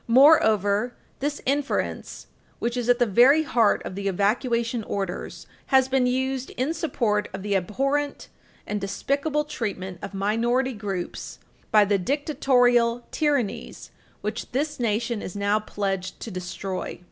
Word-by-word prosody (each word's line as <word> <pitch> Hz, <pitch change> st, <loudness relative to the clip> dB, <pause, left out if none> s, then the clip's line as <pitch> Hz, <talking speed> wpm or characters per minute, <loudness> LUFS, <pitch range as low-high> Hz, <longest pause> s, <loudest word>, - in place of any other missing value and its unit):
Moreover, 235 Hz, -, +5 dB, 0.2 s
this 290 Hz, +1 st, -2 dB
inference, 280 Hz, +1 st, -2 dB, 0.3 s
which 235 Hz, +1 st, -2 dB
is 245 Hz, -1 st, -2 dB
at 245 Hz, -, +5 dB
the 245 Hz, -, +3 dB
very 250 Hz, +9 st, +5 dB
heart 240 Hz, -9 st, +2 dB
of -, -, -5 dB
the 200 Hz, +1 st, -3 dB
evacuation 230 Hz, +4 st, 0 dB
orders, 195 Hz, -3 st, -4 dB, 0.2 s
has 265 Hz, -1 st, +4 dB
been 265 Hz, -1 st, +2 dB
used 260 Hz, +1 st, -1 dB
in 265 Hz, +6 st, 0 dB
support 235 Hz, -10 st, 0 dB
of 190 Hz, -, -7 dB
the 205 Hz, -1 st, 0 dB
abhorrent 275 Hz, +10 st, -1 dB, 0.4 s
and 210 Hz, -1 st, -3 dB
despicable 280 Hz, +9 st, -1 dB
treatment 195 Hz, -10 st, -4 dB
of 200 Hz, 0 st, -7 dB
minority 235 Hz, +6 st, +1 dB
groups 200 Hz, -5 st, -5 dB, 0.3 s
by 210 Hz, -1 st, +6 dB
the 200 Hz, 0 st, +2 dB
dictatorial 245 Hz, -, +2 dB
tyrannies 285 Hz, -9 st, -1 dB, 0.3 s
which -, -, -4 dB
this 295 Hz, +3 st, -1 dB
nation 230 Hz, -1 st, -1 dB
is 185 Hz, -, -7 dB
now 205 Hz, +1 st, +1 dB
pledged 195 Hz, -3 st, -3 dB
to 225 Hz, -, -6 dB
destroy. 185 Hz, +1 st, -5 dB
235 Hz, 135 wpm, -25 LUFS, 200-265 Hz, 0.4 s, by